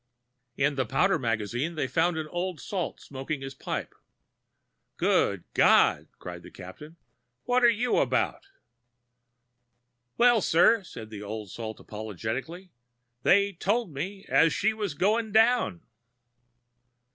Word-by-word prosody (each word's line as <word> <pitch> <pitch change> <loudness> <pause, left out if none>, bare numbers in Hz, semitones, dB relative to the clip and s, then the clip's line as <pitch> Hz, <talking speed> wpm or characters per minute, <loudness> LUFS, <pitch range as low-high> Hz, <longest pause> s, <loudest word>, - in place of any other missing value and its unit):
In 140 +1 +2
the 130 - +1
powder 185 - +2
magazine 120 +6 -2
they 155 - -1
found 160 +6 +1
an 160 - -2
old 175 -1 -3
salt 185 +1 -4
smoking 135 +1 -6
his 135 0 -6
pipe. - - -5 1.0
"Good - - +1
God," - - +4
cried - - -8
the - - -12
Captain, 150 - -11 0.5
"what 250 0 +1
are 240 - +8
you 235 +2 +1
about?" - - 0 1.7
"Well, 240 -2 +5
sir," 190 +7 +4
said 110 -10 -10
the 105 -2 -7
old 105 -1 -6
salt, 110 -2 -6
apologetically, 110 - -6 0.5
"they 200 +5 +3
told 200 +1 -1
me 195 +8 -5
as 165 -1 +4
she 220 +2 +1
were 215 -2 -3
going 215 +3 +1
down." 225 -6 +3
165 Hz, 125 wpm, -27 LUFS, 125-205 Hz, 1.7 s, are